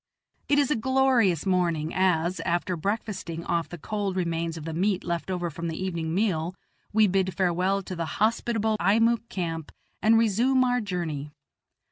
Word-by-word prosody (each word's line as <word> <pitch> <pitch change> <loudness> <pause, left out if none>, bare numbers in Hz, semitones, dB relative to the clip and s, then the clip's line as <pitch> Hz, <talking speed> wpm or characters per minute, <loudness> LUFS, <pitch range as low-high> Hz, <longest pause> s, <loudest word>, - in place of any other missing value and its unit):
It 290 - +4
is 290 -1 +3
a - - +3
glorious 245 - +2
morning 170 -4 +1
as, 180 -1 +1
after 175 +2 -1
breakfasting 190 -2 -3
off 170 -1 -1
the 175 - -7
cold 205 +2 -3
remains 170 -2 -1
of 155 - -7
the 165 - -4
meat 190 +3 0
left 170 +1 -3
over 175 -2 -2
from 170 +3 -5
the 160 - -4
evening 170 -3 -2
meal, 180 -4 0 0.4
we 215 0 +5
bid 190 -1 +1
farewell 185 +1 +1
to 185 - -6
the 165 -1 -2
hospitable 220 0 +1
Eimuek 225 +4 +2
camp 165 -4 -4 0.3
and 225 +1 +5
resume 235 +4 +3
our 250 -1 +1
journey. 170 -8 -3
185 Hz, 165 wpm, -26 LUFS, 170-215 Hz, 0.4 s, we